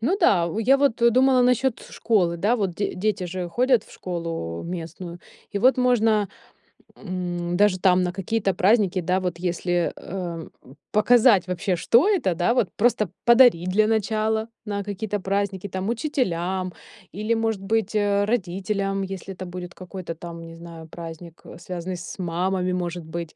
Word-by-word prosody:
Ну 280 - +1
да, 175 - +4
у 170 - -4
я 250 +5 +4
вот, 275 -4 +1
э, 235 - +6
думала 255 +1 +4
насчёт 250 0 +2
школы, 185 -7 +1
да, 210 +8 +2
вот 195 -6 -1
д 200 - -2
дети 205 0 -1
же 180 0 -4
ходят 245 +4 +2
в - - -18
школу 165 - -5
местную. 170 0 -7 0.3
И 200 - -1
вот 255 +6 +4
можно, 225 -5 +2 0.7
м, 175 -2 -3
даже 200 -2 +3
там 185 -1 +4
на 180 - -1
какие-то 195 +1 -1
праздники, 195 -1 +3
да, 185 +2 +1
вот 180 -2 -3
если, 175 0 0
эм, 175 -3 -6 0.4
показать 215 -3 +5
вообще, 180 +1 -1
что 235 - +4
это, 315 - +1
да, 175 +7 +2
вот 235 -7 +1
просто 215 -3 +2 0.2
подарить 235 -8 +6
для 215 +3 +3
начала 220 0 0 0.2
на 200 -1 -3
какие-то 205 +1 -3
праздники. 200 0 -2
Там, 190 +2 -3
учителям 190 - -1 0.4
или, 215 +3 -1
может 225 -3 -1
быть, 215 +1 -1
э, 205 -1 +2
родителям, 195 -1 -1
если 195 0 -6
это 185 0 -7
будет 180 0 -7
какой-то 185 -2 -7
там, 165 0 -9
не 165 - -10
знаю, 165 -1 -11
праздник, 165 0 -10 0.2
связанный 180 +1 -5
с 175 - -9
мамами, 180 +1 -1
может 175 -2 -3
быть. 165 0 -6
190 Hz, 165 wpm, -24 LUFS, 175-220 Hz, 0.7 s, э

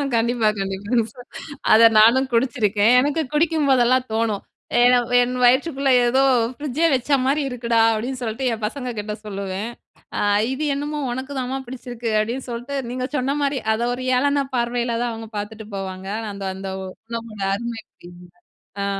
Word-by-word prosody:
கண்டிப்பா, 230 -1 +1
கண்டிப்பா 205 +4 -1 0.6
அத 230 +1 +8
நானும் 260 +5 +5
குடிச்சுருக்கேன், 230 -2 +2
எனக்கு 290 +4 +1
குடிக்கும்போதெல்லாம் 270 -6 +3
தோணும். 220 -3 0 0.4
ஏன்னா, 245 0 +6 0.2
என் 245 +1 0
வயிற்றுக்குள்ள 270 +2 +2 0.2
ஏதோ 260 +3 +3 0.3
ஃப்ரிட்ஜே 295 +4 -1
வச்ச 255 +3 -4 0.2
மாரி 285 +3 +2
இருக்குடா, 235 -2 +1
அப்டின்னு 250 +4 -4
சொல்ட்டு 225 +4 -3
என் 220 -1 -6
பசங்க 250 +2 -4
கிட்ட 210 0 -4
சொல்லுவேன். 200 +1 -4 0.5
அ - - 0 0.3
இது 300 +3 -3
என்னமோ 295 +1 -3
உனக்குதாம்மா 260 0 -3
பிடிச்சிருக்கு 245 -2 -6
அப்டின்னு 240 +5 -3
சொல்ட்டு, 245 +4 -5 0.2
நீங்க 255 0 -3
சொன்ன 270 +3 0
மாரி 280 -2 0
அத 225 - -2
ஒரு 255 - -6
ஏளன 285 +1 +1
பார்வைல 240 -1 0
தான் 240 - -1
அவங்க 225 -1 -8
பாத்துட்டு 210 +1 -6
போவாங்க. 190 0 -6
ஆனா, 220 -2 -5
அந்த 195 -1 -5
அந்த 190 0 -6 0.4
உணவோட 230 -3 -6
அருமை 235 0 -5 0.2
புரியல. 175 0 -13 0.5
அ - - -1
240 Hz, 150 wpm, -22 LUFS, 220-265 Hz, 0.6 s, அத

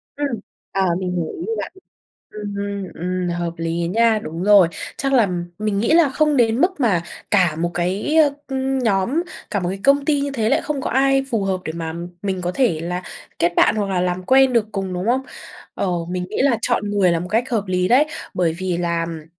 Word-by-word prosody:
Ừm. 280 -6 -2 0.3
Ờ, 195 -1 +1
mình 180 -1 -2
hiều 170 -3 -2
ý 340 - -4
của 450 - -1
bạn. - - -6 0.6
Ừm 210 -1 -5
hưm, 200 -1 -3
ừm, 180 +1 -2
hợp 170 -1 -2
lý 165 +1 -2
á 170 - 0
nha, 225 +4 +3
đúng 165 +3 -5
rồi. 200 -4 +6 0.3
Chắc 275 -1 -1
là 235 -6 +4 0.3
mình 210 -2 -1
nghĩ 230 - +1
là 325 -3 +6
không 300 +1 +1
đến 230 0 +3
mức 360 -2 +1
mà 200 -10 +2 0.3
cả 180 -6 +3
một 170 +2 -1
cái, 190 - -1
ơ, 310 -2 +6 0.2
ừm, 265 0 -1
nhóm, 235 - +1 0.3
cả 205 -2 0
một 175 - -2
công 280 +1 +4
ty 290 -1 +2
như 280 0 -1
thế 225 -5 0
lại - - +2
không 300 -3 -3
có - - -3
ai 270 +1 +3
phù 220 -4 0
hợp 190 -1 -1
để 160 - -3
mà 165 -1 -4 0.3
mình 190 -2 -2
có 175 - -1
thể 230 -12 +1
là 180 +2 -3 0.4
kết 170 +1 +2
bạn - - +4
hoặc 205 -2 0
là 185 -2 +1
làm 180 0 -1
quen 265 +3 +5
được 230 -3 +2
cùng, 195 -2 -3
đúng 180 +2 -3
không? 255 +3 +2 0.5
Ờ, 195 - -1 0.2
mình 180 0 -3
nghĩ - - -4
là 260 -5 +3
chọn 210 -4 0
người 200 -3 +3
là 165 - 0
một 180 - -5
cách 230 +6 0
hợp 220 -4 0
lý 180 0 0
đấy. 255 +5 +5 0.3
Bởi 170 -3 +1
vì 185 -2 -1
làm 170 -2 -2
200 Hz, 230 wpm, -21 LUFS, 180-260 Hz, 0.6 s, rồi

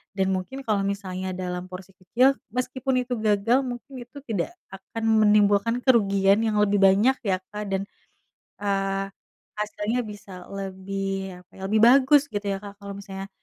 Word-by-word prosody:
dan 190 -1 +1
mungkin 190 +9 -4
kalau 210 -2 +2
misalnya 190 -2 -3
dalam 180 0 -4
porsi 185 +1 -10
kecil, 240 +9 +2 0.2
meskipun 255 0 -1
itu 250 0 -4
gagal 215 +3 +2
mungkin 255 +2 -7
itu 245 +4 -16
tidak 230 - -3 0.2
akan 195 +4 -8 0.2
menimbulkan 210 +2 +4
kerugian 200 -5 +4
yang 220 -1 0
lebih 205 0 +2
banyak 200 +7 +5
ya 195 -4 +1
Kak, 210 0 -4
dan, 195 0 0 0.8
eee, 195 -1 -1 0.5
hasilnya 210 +3 -2
bisa 200 -3 -10
lebih, 195 0 -4
apa 180 - -57
ya, - - -11
lebih 215 +2 +2
bagus 270 +4 +7
gitu 205 0 -3
ya 195 -1 0
Kak, 200 0 -10
kalau 200 0 -7
misalnya 195 -1 -7
200 Hz, 155 wpm, -25 LUFS, 195-230 Hz, 0.8 s, bagus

